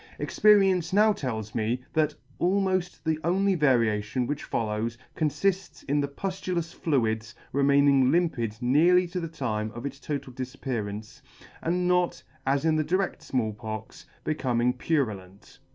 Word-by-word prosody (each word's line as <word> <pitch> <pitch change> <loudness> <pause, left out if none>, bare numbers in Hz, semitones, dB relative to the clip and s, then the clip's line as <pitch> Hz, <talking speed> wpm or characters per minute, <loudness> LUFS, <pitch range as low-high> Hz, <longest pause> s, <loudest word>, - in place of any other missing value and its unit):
Experience 195 -5 +4
now 210 +2 +5
tells 110 - -4
me 115 +2 0
that 155 -1 +1 0.2
almoft 185 -1 0
the 160 -1 0
only 195 +3 +2
variation 120 - +2
which 145 +3 -3
follows 110 +1 -2 0.2
conlifts 175 +6 -1
in 145 +1 +2
the 140 - -1
puftulous 175 +2 -3
fluids 115 -6 -1 0.2
remaining 140 -1 +4
limpid 125 -11 0
nearly 170 +9 +4
to 180 +1 -4
the 165 - -3
time 110 -9 -3
of 120 +3 -6
its 140 -1 -5
total 140 -3 -5
difappearaince; 120 -5 -5 0.4
and 180 +2 0
not, 180 -1 +1 0.2
as 140 +2 +2
in 160 -1 +3
the 155 - +2
dired 185 +5 -1
Small 115 -5 -1
Pox, 110 +1 -7 0.2
becoming 125 -5 +1
purulent. 105 - -3
140 Hz, 135 wpm, -27 LUFS, 115-175 Hz, 0.4 s, now